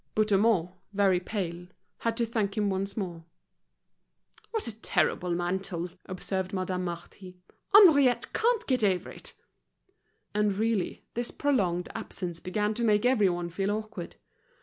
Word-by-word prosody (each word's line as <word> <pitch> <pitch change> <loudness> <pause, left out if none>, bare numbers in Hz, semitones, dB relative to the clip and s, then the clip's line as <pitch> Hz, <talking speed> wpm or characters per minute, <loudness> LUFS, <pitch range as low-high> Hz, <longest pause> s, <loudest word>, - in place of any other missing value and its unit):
Bouthemont, 210 -4 +3 0.2
very 195 -3 +3
pale, 180 -3 -4 0.3
had 230 -1 -1
to 235 - +2
thank 215 -3 -2
him 205 -2 +1
once 195 +2 -3
more. 175 -5 -4 1.3
"What 445 - -2
a 230 - -3
terrible 180 -4 0
mantle," 175 0 -2 0.2
observed 190 +1 -3
Madame 185 -1 -2
Marty. 180 +2 -8 0.3
"Henriette 300 - +6
can't 470 0 +2
get 255 -4 +1
over 190 -3 +1
it." - - -11 1.0
And 210 -1 +2
really, 220 -3 -1
this 240 +1 -2
prolonged 185 -12 0
absence 175 -2 -5
began 210 +4 -1
to 235 - -2
make 215 0 +3
everyone 190 -9 +2
feel 195 +3 -1
awkward. 215 -4 -4
200 Hz, 130 wpm, -28 LUFS, 180-225 Hz, 1.3 s, Henriette